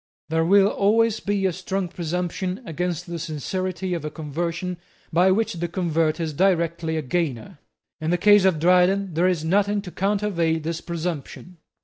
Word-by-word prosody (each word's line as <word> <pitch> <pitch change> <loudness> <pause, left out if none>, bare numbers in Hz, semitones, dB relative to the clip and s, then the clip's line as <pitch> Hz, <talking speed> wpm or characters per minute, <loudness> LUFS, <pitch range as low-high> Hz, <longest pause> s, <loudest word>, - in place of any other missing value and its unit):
There 160 +1 +1
will 195 +3 +5
always 220 +2 +2
be 200 -1 -1
a 185 - +1
strong 190 +1 -3
presumption 180 +3 -3
against 175 0 -3
the 170 -2 -5
sincerity 180 +4 -3
of 170 - -3
a 150 - -3
conversion 170 +4 -4 0.4
by 180 +3 +5
which 220 +3 +1
the 175 0 -3
convert 165 -2 0
is 160 -2 -2
directly 170 -2 +1
a 155 - -2
gainer. 140 -4 -3 0.4
In 155 0 -2
the 175 - +2
case 205 +2 +6
of 190 -4 +3
Dryden 180 +3 +3
there 170 +3 +2
is 170 -4 0
nothing 205 +4 +2
to 180 - -8
countervail 195 -5 0
this 165 +1 -4
presumption. 170 +1 -5
175 Hz, 165 wpm, -23 LUFS, 165-190 Hz, 0.4 s, case